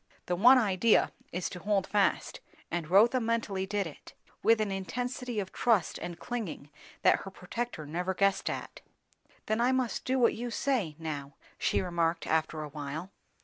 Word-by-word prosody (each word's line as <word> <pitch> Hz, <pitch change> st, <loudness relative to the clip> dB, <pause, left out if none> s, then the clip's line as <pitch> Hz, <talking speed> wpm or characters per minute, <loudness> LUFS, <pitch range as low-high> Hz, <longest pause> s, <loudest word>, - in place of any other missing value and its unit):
The 180 Hz, -, 0 dB
one 245 Hz, +8 st, +7 dB
idea 215 Hz, -1 st, +3 dB, 0.2 s
is 180 Hz, +1 st, -2 dB
to 180 Hz, -, -7 dB
hold 200 Hz, 0 st, +1 dB
fast; 205 Hz, -1 st, +1 dB, 0.3 s
and 170 Hz, -3 st, -2 dB
Rotha 220 Hz, +7 st, +5 dB
mentally 225 Hz, -5 st, -1 dB
did 205 Hz, 0 st, 0 dB
it, 160 Hz, -, -11 dB, 0.3 s
with 225 Hz, 0 st, +4 dB
an 215 Hz, -2 st, 0 dB
intensity 245 Hz, +5 st, -3 dB
of 190 Hz, -2 st, -4 dB
trust 220 Hz, -8 st, +2 dB
and 175 Hz, -1 st, -6 dB
clinging 200 Hz, -12 st, -5 dB, 0.3 s
that -, -, +5 dB
her 195 Hz, -, -7 dB
protector 190 Hz, -1 st, -5 dB
never 180 Hz, +5 st, -2 dB
guessed 195 Hz, 0 st, +2 dB
at. -, -, -6 dB, 0.6 s
"Then 220 Hz, +2 st, 0 dB
I 245 Hz, +2 st, +4 dB
must 260 Hz, -3 st, 0 dB
do 260 Hz, +1 st, 0 dB
what 240 Hz, -2 st, +4 dB
you 240 Hz, +1 st, -4 dB
say, 230 Hz, -, 0 dB
now?" 145 Hz, -4 st, -5 dB, 0.2 s
she -, -, +1 dB
remarked 170 Hz, -2 st, 0 dB
after 160 Hz, -1 st, 0 dB
a 150 Hz, -, -6 dB
while. 150 Hz, +5 st, -6 dB
195 Hz, 170 wpm, -30 LUFS, 165-230 Hz, 0.6 s, one